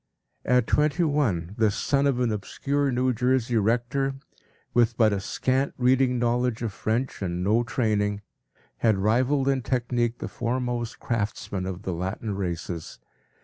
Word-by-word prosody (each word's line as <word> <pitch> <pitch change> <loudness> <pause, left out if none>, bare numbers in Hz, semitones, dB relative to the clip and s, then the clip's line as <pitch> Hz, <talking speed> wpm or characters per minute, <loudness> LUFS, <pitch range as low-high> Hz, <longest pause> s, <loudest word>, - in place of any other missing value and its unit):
” - - -49
At 125 -1 +3
twenty 150 +6 +2
one 110 - 0
this 110 -3 +3
son 140 0 +1
of 130 -3 +1
an 120 -2 +1
obscure 140 +7 -1
New 125 +1 +1
Jersey 125 0 +1
rector, 120 +6 +1 0.6
with 120 -1 +3
but 110 -3 +4
a 100 - 0
scant 130 +7 -1
reading 125 0 +3
knowledge 120 0 0
of 110 -3 -2
French 115 +5 -2
and 90 -1 -2
no 110 +5 +3
training, 105 -4 0 0.6
had 110 -3 +2
rivaled 125 +7 +2
in 135 -1 +2
technique 120 -1 0
the - - -5
foremost 120 -1 -2
craftsmen 105 -4 -2
of 95 +1 -5
the 95 - -2
Latin 95 +5 -3
races. 85 -3 -4
120 Hz, 150 wpm, -26 LUFS, 105-130 Hz, 0.6 s, but